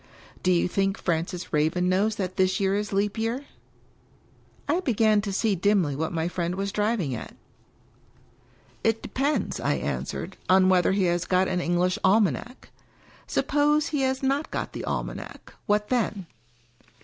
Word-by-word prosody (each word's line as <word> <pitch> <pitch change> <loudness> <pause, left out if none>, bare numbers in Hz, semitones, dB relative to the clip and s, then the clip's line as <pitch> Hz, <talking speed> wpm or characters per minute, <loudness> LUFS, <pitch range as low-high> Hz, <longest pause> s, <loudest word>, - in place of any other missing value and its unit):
" - - -22
Do 185 - +2
you 175 0 +3
think 195 +2 0
Francis 170 +1 -2
Raven 160 +4 +2
knows 200 +4 +2
that 185 -2 -3
this 185 0 +2
year 195 -1 +1
is 210 +1 -2
Leap 205 +2 0
Year? 235 +5 -2 0.6
" - - -33
(I 345 - +2
began 220 - +2
to 200 -1 -4
see 210 +2 +1
dimly 185 -5 +2
what 160 +3 -2
my 165 0 -1
friend 175 0 -2
was 195 +1 -2
driving 210 - 0
at.) 115 - -7 1.5
"It 225 0 +1
depends," 280 +3 -1
I - - +1
answered, - - -4
"on 185 0 +5
whether 185 0 +3
he 195 -1 +1
has 175 0 +1
got 185 0 +2
an 180 -1 -1
English 175 +1 +1
almanac. 205 - +1 0.6
Suppose 295 +1 +2
he 290 -2 -1
has 265 0 0
not 275 +3 0
got - - -4
the - - -5
almanac - - -5
— - - -40
what 210 0 +1
then?" 220 -6 0
195 Hz, 165 wpm, -26 LUFS, 180-225 Hz, 1.5 s, on